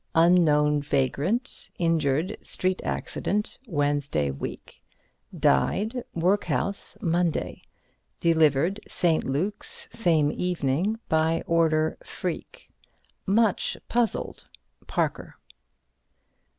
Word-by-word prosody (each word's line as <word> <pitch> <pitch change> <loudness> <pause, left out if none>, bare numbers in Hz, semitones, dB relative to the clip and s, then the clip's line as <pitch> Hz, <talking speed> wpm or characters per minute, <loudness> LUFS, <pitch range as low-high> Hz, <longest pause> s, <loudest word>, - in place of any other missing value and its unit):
Unknown 155 -4 +4
vagrant 145 - -1
injured 165 -2 +1
street 185 0 -1
accident 210 +1 -2
Wednesday 145 - 0
week. 70 - -8 0.6
Died 220 - +1
workhouse 200 +3 0
Monday. 170 -1 0 0.6
Delivered 160 +3 +3
St. 170 -3 +3
Luke's 180 +10 -2
same 160 -9 +3
evening 180 +4 -1
by 160 +1 +1
order 160 -2 +2
Freke. - - -6 0.6
Much 210 0 +2
puzzled. 235 -2 -1 0.4
Parker." - - -2
165 Hz, 75 wpm, -26 LUFS, 150-190 Hz, 0.6 s, Unknown